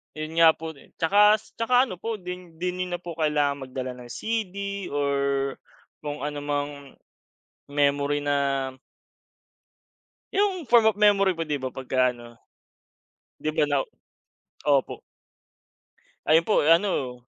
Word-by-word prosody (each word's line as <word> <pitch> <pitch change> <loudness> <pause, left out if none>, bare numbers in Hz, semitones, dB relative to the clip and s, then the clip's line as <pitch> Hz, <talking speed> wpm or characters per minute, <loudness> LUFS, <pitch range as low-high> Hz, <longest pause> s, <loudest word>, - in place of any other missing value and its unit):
Yun 155 +2 -4
nga 165 -1 +7
po 160 0 -6
din. 140 - -19
Tsaka 205 +6 +5
s 215 - -11
tsaka 245 +2 +4
ano 185 -9 -6
po, 230 0 -3
din 180 -3 -8
di 180 +2 -2
niyo 180 0 -3
na - - -7
po 170 -2 -8
kailangan 145 -3 0
magdala 130 0 -4
ng 125 -1 -11
CD 200 - -3
or 140 -1 0 0.8
kung 145 0 -6
anumang 145 -1 -4 0.7
memory 145 0 +1
na 145 0 +1 2.0
yung 385 -6 +1
form 230 -2 +6
of 210 - -16
memory 200 -2 +5
po, 165 -2 -3
di 150 - 0
ba, 130 -2 -4
pagka 130 -1 +1
ano. 120 -1 -13 1.1
Di - - -2
ba 155 0 +2
na 145 -2 +1 0.9
opo. 140 -3 +2 1.3
Ayun 160 +2 +5
po 210 - +2
ano 160 -8 +2
160 Hz, 135 wpm, -25 LUFS, 145-195 Hz, 2.0 s, nga